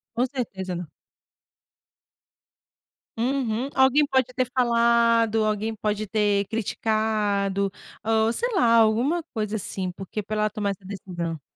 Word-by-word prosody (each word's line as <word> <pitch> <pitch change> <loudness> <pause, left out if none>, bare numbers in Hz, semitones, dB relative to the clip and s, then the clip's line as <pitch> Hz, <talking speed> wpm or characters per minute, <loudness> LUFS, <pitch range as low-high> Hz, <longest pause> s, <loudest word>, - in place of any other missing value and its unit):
Com 245 +2 +2
certeza 200 -9 -4
não. 175 -3 -6 2.3
Uhum. 250 0 -1
Alguém 265 +3 +5
pode 260 -2 +2
ter 255 -1 0
falado, 235 -2 +3
alguém 215 +1 -1
pode 215 -1 -2
ter 205 -1 +1
criticado, 210 -2 0 0.3
ou 220 0 +2
sei 475 - -2
lá, 235 -8 +4
alguma 235 +10 +3
coisa 215 -1 -2
assim, 190 -2 -4
porque 195 +3 -6
pra 215 +2 -4
ela 215 0 +2
tomar 205 -2 -2
essa 195 -1 -6
decisão. 175 -5 -5
220 Hz, 125 wpm, -25 LUFS, 200-235 Hz, 2.3 s, Alguém